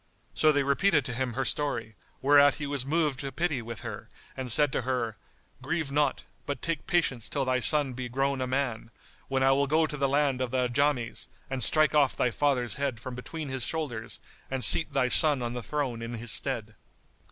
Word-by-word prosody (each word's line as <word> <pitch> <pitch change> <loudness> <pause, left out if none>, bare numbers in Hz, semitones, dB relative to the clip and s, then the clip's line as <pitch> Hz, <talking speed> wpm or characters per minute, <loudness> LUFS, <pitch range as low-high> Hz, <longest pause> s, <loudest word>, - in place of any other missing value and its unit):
So 155 - +4
they 145 -1 +1
repeated 145 +1 +2
to 125 - -3
him 125 0 -2
her 135 +3 -2
story; 115 -7 -1 0.3
whereat 145 0 +6
he 150 - -5
was 140 -2 -1
moved 150 -3 0
to 135 -1 -4
pity 155 -6 -1
for 115 0 -7
her - - -7 0.3
and 130 -2 -3
said 145 +3 +5
to - - -1
her, 120 -3 -2 0.5
"Grieve 155 +2 -2
not, 145 -1 0 0.2
but 140 -3 -3
take 165 -1 -3
patience 135 -9 0
till 140 -2 -1
thy 130 0 +1
son 145 0 +3
be 125 0 -5
grown 135 +1 -1
a 130 - -1
man, 125 -4 -2 0.4
when 135 -1 0
I 135 - +5
will 140 +1 +2
go 160 +3 +3
to 150 - -5
the 140 -1 +1
land 140 -2 +1
of 130 - -1
the 125 0 0
Ajams 130 -1 -1 0.2
and 135 -1 -2
strike 155 +2 +4
off 145 -3 +3
thy 125 - +1
father's 125 -5 0
head 135 -5 -1
from 130 +2 -7
between 145 +4 -7
his 130 -2 -3
shoulders 125 -9 -3 0.3
and 130 -1 -3
seat 165 - +6
thy 135 -2 +1
son 140 +1 +4
on 120 0 -3
the 125 - -4
throne 130 -3 -3
in 115 +1 -5
his 115 0 -3
stead." 115 -6 -3
135 Hz, 210 wpm, -28 LUFS, 125-145 Hz, 0.5 s, whereat